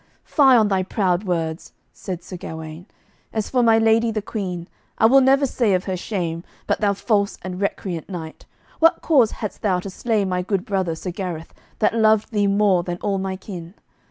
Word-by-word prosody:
"Fie 270 -5 +5
on 220 -2 +4
thy 190 -2 +2
proud 185 0 0
words," 165 -3 -3 0.2
said 180 -2 -6
Sir 185 - -8
Gawaine; 160 0 -8 0.4
"as 220 -2 -3
for 255 - +3
my 225 -2 +5
lady 225 +1 +3
the 220 -1 -1
Queen, 180 -6 -4 0.3
I - - +4
will 270 +4 +7
never 270 +2 +4
say 235 -6 +1
of 185 - -1
her 190 - -2
shame, 175 -3 -3 0.2
but - - -1
thou 205 -1 +3
false 200 0 0
and 185 0 -5
recreant 190 -4 -3
knight, 160 -4 -8 0.3
what 330 +1 +4
cause 265 -9 +4
hadst 210 -3 -6
thou 190 -4 +1
to 195 - -7
slay 215 0 0
my 180 -1 -1
good 195 0 -2
brother 190 -5 -1
Sir 180 +3 -5
Gareth, 175 -3 -6 0.2
that 215 - +2
loved 220 -1 +3
thee 205 -2 +1
more 200 -2 +3
than 175 0 -4
all 200 -2 0
my 190 0 -3
kin? 185 -2 -9
195 Hz, 195 wpm, -22 LUFS, 180-220 Hz, 0.4 s, will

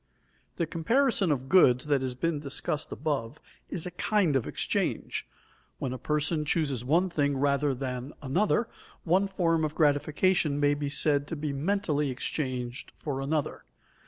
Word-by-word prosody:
_ - - -45
The 170 - 0
comparison 195 - +1
of 130 -2 -1
goods 130 -7 +5
that 145 -2 +2
has 130 -1 -3
been 155 +4 -1
discussed 145 +1 -4
above 140 -3 -3 0.3
is 175 -2 -2
a 180 - -4
kind 180 -3 +1
of 130 - +1
exchange. - - -2 0.5
When 130 - -3
a 130 - -6
person 150 +4 0
chooses 145 -5 0
one 165 +8 +3
thing 145 -5 0
rather 140 0 +1
than 125 +1 -4
another, 200 - +1 0.4
one 185 +4 +3
form 165 -4 +1
of 155 0 -2
gratification 155 +1 +2
may 145 0 +3
be 145 0 -2
said 145 0 +2
to 165 - -4
be 150 -1 -3
mentally 150 -2 0
exchanged 125 -1 -3
for 135 -3 -3
another. 145 +1 -2
150 Hz, 160 wpm, -28 LUFS, 135-165 Hz, 0.5 s, goods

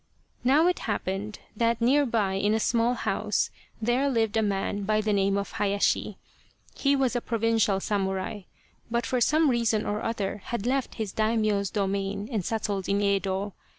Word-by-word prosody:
Now 280 +6 +4
it 360 0 +2
happened 200 +1 -3 0.2
that 230 +1 +1
near 275 +4 +3
by 215 -5 +1
in 205 +3 +1
a - - +1
small 235 +2 +2
house - - -1 0.3
there 240 +5 +1
lived 225 -4 +1
a 220 - +3
man 200 0 -1
by 215 +2 +1
the 215 0 0
name 195 0 +2
of 200 - -3
Hayashi. 200 0 0 0.6
He 280 0 +2
was 260 -2 +1
a 245 - 0
provincial 225 -3 +1
samurai, 195 0 -2 0.5
but 235 +1 0
for 250 -1 0
some 310 +6 +4
reason 230 -3 +1
or 210 +1 -2
other 210 -3 -3
had 235 -3 -3
left 265 +1 -1
his 215 -4 -3
Daimio's 215 -3 +1
domain 200 0 -2
and 215 -5 -1
settled 205 -2 -2
in 200 0 +2
Yedo. 200 0 0
215 Hz, 170 wpm, -27 LUFS, 200-235 Hz, 0.6 s, Now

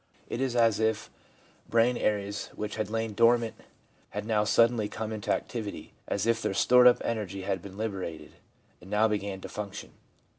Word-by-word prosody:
It 120 - -3
is 130 -2 -1
as 115 -3 +3
if 110 -1 0 0.6
brain 115 +2 +3
areas 100 -2 -1
which 105 0 -4
had 110 -2 -2
lain 110 0 -2
dormant 115 +1 +3 0.6
had 105 +1 -5
now 110 -2 +2
suddenly 115 0 +3
come 110 0 -5
into 110 -2 -3
activity 110 -5 -4
— - - -40
as 100 - -1
if 115 0 +2
their 95 - -1
stored 125 +3 +6
up 125 - +7
energy 100 -4 -3
had 95 0 -2
been 100 -1 -10
liberated, 95 -8 -4 0.5
and 90 - -13
now 105 +2 +3
began 100 -2 -3
to - - -6
function. 105 -1 -7
110 Hz, 180 wpm, -28 LUFS, 100-115 Hz, 0.6 s, up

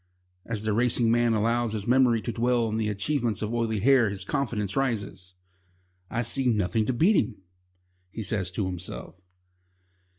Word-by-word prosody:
As 110 -2 -3
the 110 -1 0
racing 120 0 +2
man 120 0 +3
allows 115 +1 +1
his 105 -2 -4
memory 120 -2 +3
to 120 - -2
dwell 120 +1 +1
on 110 0 -2
the 110 -1 0
achievements 110 +1 -1
of 110 +2 -3
Oily 115 -3 -1
Hair 125 -2 +4
his 95 -1 -5
confidence 105 -5 -2
rises. 100 -8 -3 0.7
"I 120 +1 -1
see 130 +3 0
nothing 110 -1 +1
to - - +2
beat 175 - +3
him," 125 - -9 0.7
he 110 +3 -6
says 95 -2 -2
to 100 0 -1
himself. 90 +1 -7
115 Hz, 165 wpm, -26 LUFS, 105-120 Hz, 0.7 s, Hair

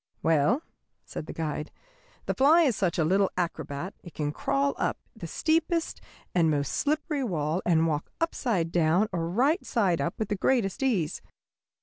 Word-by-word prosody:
] - - -42
"Well," 165 - +3 0.4
said 155 - -7
the - - -5
guide, 150 -1 -3 0.6
"the - - 0
fly 310 +6 +5
is 260 -8 +2
such 185 -4 0
a 165 - +3
little 190 +4 +3
acrobat 170 -1 -3
it 175 - -12
can 145 -1 -1
crawl 140 -1 0
up - - 0 0.2
the 180 -7 -7
steepest 325 - 0 0.3
and 170 -3 +3
most 145 -2 0
slippery 300 -1 0
wall 165 -5 -1
and 165 -2 +4
walk 150 -2 -1
upside 230 - 0
down 175 +5 +3
or 165 -2 -2
right 270 - +2
side 195 -9 +1
up 170 - -2
with 220 - -3
the 205 - 0
greatest 205 0 +1
ease. 195 - 0
180 Hz, 175 wpm, -27 LUFS, 160-250 Hz, 0.6 s, fly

